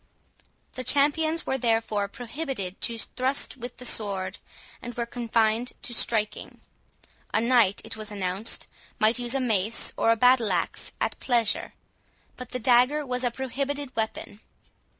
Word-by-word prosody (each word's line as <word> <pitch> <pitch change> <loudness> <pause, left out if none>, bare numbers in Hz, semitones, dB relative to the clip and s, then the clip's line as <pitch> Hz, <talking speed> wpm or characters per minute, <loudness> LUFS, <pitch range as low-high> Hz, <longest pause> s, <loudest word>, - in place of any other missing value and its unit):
The 255 - -5
champions 315 +5 +2
were 265 - -1
therefore 225 -3 +1
prohibited 240 - -5
to 230 - -1
thrust 260 +5 -1
with 245 0 -8
the 250 - -9
sword, 195 -4 0 0.4
and 240 0 -7
were 235 -1 -1
confined 230 0 0
to 240 - -4
striking. 220 -2 -1 0.8
A - - +5
knight, 230 -4 +3
it - - -4
was 215 -1 -6
announced, 195 +1 -1 0.3
might 220 +3 +3
use 240 +1 0
a - - +2
mace 220 -3 +1
or 230 0 +4
battle 245 -2 +4
axe 175 -2 -2
at - - -2
pleasure, 235 -4 0 0.6
but 250 - -9
the 255 - -3
dagger 250 +5 +3
was 250 -1 -2
a 245 - +3
prohibited 270 +2 -4
weapon. 220 -2 -3
235 Hz, 145 wpm, -26 LUFS, 220-255 Hz, 0.8 s, A